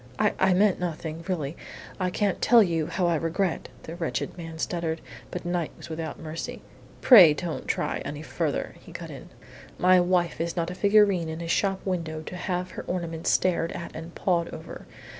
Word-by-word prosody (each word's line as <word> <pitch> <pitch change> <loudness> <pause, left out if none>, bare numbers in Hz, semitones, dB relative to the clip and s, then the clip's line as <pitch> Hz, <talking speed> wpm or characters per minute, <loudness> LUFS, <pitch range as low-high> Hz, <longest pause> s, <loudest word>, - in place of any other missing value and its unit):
"I - - +2
I 190 -1 +4
meant 200 0 +3
nothing. 165 -2 -4
Really, 160 -5 -2 0.4
I 185 -1 +1
can't 200 +1 0
tell 235 -2 +7
you 165 -4 0
how 180 - -1
I 170 - +3
regret 165 +3 -1
" - - -22
the 165 - -7
wretched 170 -2 -3
man 165 -2 -8
stuttered. 165 -1 -2 0.3
But 180 - -6
Knight 175 -2 -1
was - - -11
without 160 0 -5
mercy. 160 0 -6 0.4
"Pray 180 - +9
don't 170 0 -4
try - - -1
any 145 +1 -6
further," 155 -2 -2
he - - -14
cut - - -7
in. - - -10 0.5
"My 185 0 +5
wife 175 -2 +1
is 170 0 -2
not 170 0 -1
a - - -4
figurine 200 -3 +4
in 160 +1 -5
a 170 - -5
shop 195 +3 0
window 165 -4 -2
to 180 - -7
have 180 0 -3
her - - -6
ornaments 170 -2 -2
stared 170 -2 +2
at 170 - -7
and 165 +1 -8
pawed 170 -3 +1
over. - - -9
170 Hz, 195 wpm, -26 LUFS, 165-185 Hz, 0.5 s, Pray